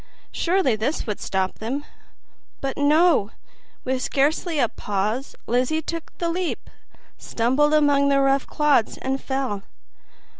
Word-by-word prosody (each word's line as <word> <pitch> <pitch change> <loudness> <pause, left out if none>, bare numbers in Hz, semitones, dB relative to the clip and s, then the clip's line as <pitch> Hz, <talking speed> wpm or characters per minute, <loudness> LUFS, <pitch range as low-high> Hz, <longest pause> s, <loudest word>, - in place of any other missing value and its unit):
Surely 345 - +1
this 240 +9 -2
would 210 -2 -4
stop 190 -1 -2
them! 265 +7 -3 0.7
But 270 -1 -3
no; 300 - +4 0.5
with 260 0 -1
scarcely 305 +5 0
a 245 - +3
pause 210 +6 -3
Lizzie 255 +7 0
took 330 +1 -5
the 340 - -1
leap, 355 +1 -3 0.5
stumbled 270 +6 +1
among 285 -2 +4
the 275 0 +3
rough 275 0 +2
clods 295 -7 +2
and 265 +1 -2
fell. 265 -7 -2
275 Hz, 125 wpm, -23 LUFS, 240-300 Hz, 0.7 s, no